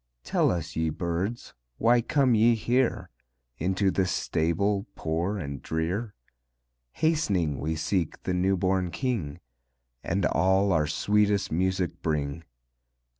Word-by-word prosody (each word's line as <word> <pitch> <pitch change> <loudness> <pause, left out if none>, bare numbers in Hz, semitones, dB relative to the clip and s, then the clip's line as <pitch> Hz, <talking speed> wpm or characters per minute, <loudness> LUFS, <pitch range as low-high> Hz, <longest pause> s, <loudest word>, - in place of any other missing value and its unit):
"Tell - - +2
us, 85 -3 -3
ye 80 0 0
birds, 90 +8 -3 0.2
why 120 +1 +4
come 130 +1 +2
ye 115 +2 +5
here. 120 - 0 0.5
Into 95 +3 +1
this 90 -1 0
stable, 95 +5 0
poor 85 +6 -2
and 70 -7 -5
drear?" 90 +7 -2 0.8
"Hast'ning 100 - +1
we 80 +1 -2
seek 85 +1 -2
the 90 - -1
new 95 +2 +2
born 95 -1 +1
King, 100 - -3 0.6
And 95 +1 0
all 95 +2 +2
our 75 -3 +2
sweetest 105 +4 +1
music 95 +2 -1
bring." 75 0 -2
95 Hz, 125 wpm, -27 LUFS, 80-105 Hz, 0.8 s, ye